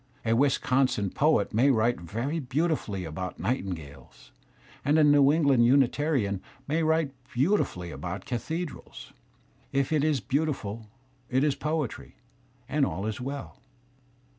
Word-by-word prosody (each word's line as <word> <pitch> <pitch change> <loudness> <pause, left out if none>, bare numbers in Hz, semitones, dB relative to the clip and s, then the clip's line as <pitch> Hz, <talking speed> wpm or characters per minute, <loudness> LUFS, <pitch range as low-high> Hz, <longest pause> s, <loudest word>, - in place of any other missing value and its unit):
A 115 - +2
Wisconsin 125 -4 +2
poet 150 -10 +2
may 125 +6 +4
write 120 -3 +2
very 120 - -3
beautifully 135 - -1
about 90 +4 -5
nightin 100 -7 -1
gales, 70 -4 -14 0.5
and 145 +2 +3
a 155 - +5
New 145 -1 +6
England 140 -6 +4
Unitarian 130 -6 +2 0.3
may 155 +3 +1
write 160 -3 +1 0.2
beautifully 130 - 0
about 85 +7 -6
cathedrals; 155 +6 -5 0.6
if 135 +1 0
it 150 -2 +2
is 150 -3 +2
beautiful, 115 -4 -2 0.4
it 130 +2 +2
is 150 -2 +3
poetry, 150 -2 -3 0.5
and 150 0 +1
all 95 -2 -1
is 110 +2 -3
well. 135 +2 -6
130 Hz, 130 wpm, -27 LUFS, 105-150 Hz, 0.6 s, New